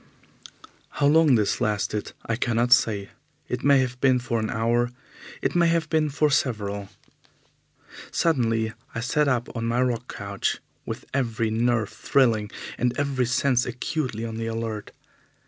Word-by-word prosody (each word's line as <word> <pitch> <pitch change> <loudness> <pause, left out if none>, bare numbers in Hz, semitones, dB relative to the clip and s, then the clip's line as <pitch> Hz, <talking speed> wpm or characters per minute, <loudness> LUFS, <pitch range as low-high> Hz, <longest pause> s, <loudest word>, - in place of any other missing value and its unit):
How 145 - +2
long 150 -2 +5
this 105 -3 +1
lasted 105 0 -1
I 115 - 0
cannot 120 +1 +3
say. 105 -5 +2 0.4
It 125 - -3
may 140 0 +6
have 125 -1 -3
been 130 -2 +5
for 120 -2 -1
an 110 - -2
hour, 120 +1 +1 0.5
it - - +1
may 170 -1 +4
have 165 -2 +1
been 155 -2 +2
for 150 +1 +1
several. 100 -7 -1 1.2
Suddenly 115 -8 +1 0.2
I - - -1
sat 145 +5 +1
up 125 -3 -1
on 115 0 -2
my 115 +1 0
rock 125 -1 0
couch, 100 0 -2 0.3
with - - -5
every 115 -4 0
nerve 115 -1 +1
thrilling 115 -6 +2 0.3
and 125 0 0
every 135 -4 0
sense 125 0 +2
acutely 125 -2 -3
on 110 -1 -5
the 115 0 -3
alert. 115 -2 -4
120 Hz, 150 wpm, -25 LUFS, 110-135 Hz, 1.2 s, may